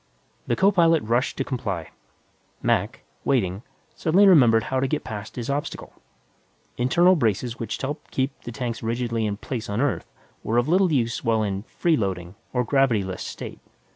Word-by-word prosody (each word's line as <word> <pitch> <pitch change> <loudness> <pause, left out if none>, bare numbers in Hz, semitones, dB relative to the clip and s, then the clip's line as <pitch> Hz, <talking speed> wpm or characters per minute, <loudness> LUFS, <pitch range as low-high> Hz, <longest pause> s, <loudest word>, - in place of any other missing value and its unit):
The 120 - +1
co 195 +7 +4
pilot 165 -4 +4
rushed 120 +4 0
to - - 0
comply. 100 - -4 0.7
Mac, - - 0 0.2
waiting, 100 -7 +1 0.3
suddenly 180 +5 +4
remembered 120 - +6
how 130 +2 -1
to 135 - +1
get 150 +3 -2
past 105 -2 -7
his 120 -2 -4
obstacle. 140 +1 -4 0.8
Internal 175 +9 +4
braces 120 - 0
which 115 -2 -4
helped 145 +3 -5
keep 135 +1 0
the 120 - -7
tanks 115 0 -4
rigidly 115 -1 -1
in 100 -1 -3
place 115 0 -5
on 100 +2 -1
Earth 140 0 -1 0.3
were 115 - 0
of 120 +2 +2
little 180 +2 +3
use 120 -5 0
while 110 -1 +2
in 100 -2 -2
"freeloading," 95 - -1 0.2
or 125 -1 +1
gravity 125 -4 +2
less, 95 -1 -5
state. - - -7
120 Hz, 170 wpm, -24 LUFS, 110-145 Hz, 0.8 s, remembered